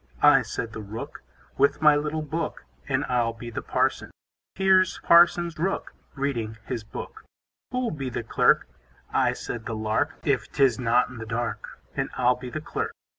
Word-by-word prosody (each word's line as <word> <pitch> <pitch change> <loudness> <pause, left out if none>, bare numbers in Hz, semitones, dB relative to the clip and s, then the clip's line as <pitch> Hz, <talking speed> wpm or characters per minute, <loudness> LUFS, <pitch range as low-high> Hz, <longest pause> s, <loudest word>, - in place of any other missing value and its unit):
I, 145 -2 +7
said 115 -1 -5
the 110 - -6
Rook, 105 +2 -7 0.4
With 140 +1 +3
my 150 -1 +6
little 150 +1 -1
book, 155 - -4 0.2
And - - +1
I'll 120 -2 +1
be 120 +1 -8
the - - -4
Parson. - - 0 0.5
Here's 190 -1 +4
Parson 170 0 +6
Rook, 190 +5 -2 0.2
Reading 120 -6 -2
his 120 -2 -4
book. - - -8 0.5
Who'll 250 -1 -1
be 135 -4 -4
the 120 - -4
Clerk? 110 - +3 0.5
I, - - +3
said 115 -2 -6
the 115 - -3
Lark, 110 +8 0
If 140 -4 0
'tis 135 -5 +3
not 125 0 +3
in 125 -2 -10
the 115 - -7
dark, 120 +1 -4 0.2
And - - -1
I'll 125 0 +4
be 125 0 -8
the 155 +5 -5
Clerk. - - -3
130 Hz, 175 wpm, -26 LUFS, 115-155 Hz, 0.5 s, I